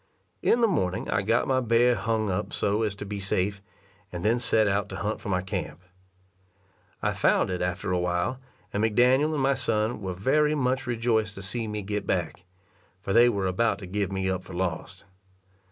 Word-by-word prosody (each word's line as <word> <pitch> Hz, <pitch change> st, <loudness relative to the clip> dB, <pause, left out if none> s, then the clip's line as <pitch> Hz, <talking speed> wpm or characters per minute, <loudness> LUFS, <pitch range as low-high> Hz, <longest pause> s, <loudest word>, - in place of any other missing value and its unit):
In 240 Hz, -, +3 dB
the 230 Hz, -, +5 dB
morning 95 Hz, -, -1 dB
I 100 Hz, -, +2 dB
got 115 Hz, +4 st, +1 dB
my 130 Hz, -1 st, +2 dB
bear 120 Hz, 0 st, +3 dB
hung 110 Hz, -3 st, -1 dB
up 95 Hz, +2 st, -3 dB
so 105 Hz, +2 st, 0 dB
as 105 Hz, -3 st, -1 dB
to 100 Hz, -, -7 dB
be 100 Hz, 0 st, -5 dB
safe, 95 Hz, 0 st, -1 dB, 0.5 s
and 90 Hz, +1 st, -5 dB
then 115 Hz, +3 st, +3 dB
set 110 Hz, -2 st, +2 dB
out 100 Hz, +1 st, 0 dB
to -, -, -6 dB
hunt 105 Hz, +2 st, -3 dB
for -, -, -6 dB
my 90 Hz, -2 st, 0 dB
camp. 90 Hz, -1 st, -5 dB, 1.2 s
I -, -, +1 dB
found -, -, +2 dB
it 90 Hz, -, -2 dB
after 90 Hz, 0 st, -2 dB
a 90 Hz, -, +1 dB
while, 90 Hz, +8 st, -1 dB, 0.3 s
and 105 Hz, -, 0 dB
McDaniel 125 Hz, +7 st, +3 dB
and 145 Hz, -3 st, -1 dB
my 135 Hz, +1 st, +3 dB
son 110 Hz, -2 st, -1 dB
were 95 Hz, -2 st, -4 dB
very 150 Hz, +10 st, +2 dB
much 130 Hz, -2 st, 0 dB
rejoiced 115 Hz, -3 st, 0 dB
to 95 Hz, -, -8 dB
see 110 Hz, +4 st, -3 dB
me 105 Hz, -1 st, -4 dB
get 105 Hz, +1 st, -3 dB
back, 90 Hz, 0 st, -2 dB, 0.5 s
for 95 Hz, +1 st, -3 dB
they 120 Hz, +1 st, +7 dB
were 100 Hz, -4 st, -1 dB
about 100 Hz, +4 st, +1 dB
to 100 Hz, -, -9 dB
give 100 Hz, +1 st, -2 dB
me 95 Hz, -1 st, -1 dB
up 95 Hz, -1 st, -1 dB
for 95 Hz, -, -11 dB
lost. 85 Hz, -3 st, -4 dB
105 Hz, 200 wpm, -26 LUFS, 95-120 Hz, 1.2 s, they